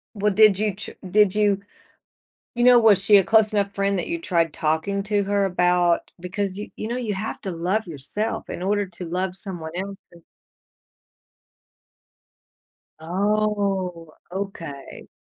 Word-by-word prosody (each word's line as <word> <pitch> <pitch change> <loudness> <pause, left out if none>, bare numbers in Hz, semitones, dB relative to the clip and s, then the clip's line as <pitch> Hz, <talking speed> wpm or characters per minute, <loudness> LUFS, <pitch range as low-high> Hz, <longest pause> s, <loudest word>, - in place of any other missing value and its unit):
Well, 210 0 +1
did 210 -1 +6
you 210 -2 0
ch 210 - -7 0.2
did 210 0 +4
you 205 -2 +2 0.9
you 240 - +1
know, 245 -1 +8
was 215 -4 +5
she 205 +1 +6
a 195 - +5
close 220 +1 +3
enough 200 -1 0
friend 200 0 0
that - - -3
you 335 0 -3
tried 170 - 0
talking 160 +6 -1
to 205 0 0
her 200 0 +1
about 180 -2 +2
because 190 +2 -3
you 205 - -6
you 215 - -5
know 240 +2 -3
you 225 -4 -2
have 215 +3 -4
to 190 - -4
love 180 +5 -1
yourself 170 +9 -4
in - - -5
order 205 +2 0
to 180 0 -9
love 180 +2 -2
someone 175 -5 -7
else 195 +1 -4 0.2
and 170 -1 -17 2.8
Oh. 195 -2 -1 0.2
Okay. 175 -8 -7
195 Hz, 155 wpm, -23 LUFS, 180-210 Hz, 2.8 s, know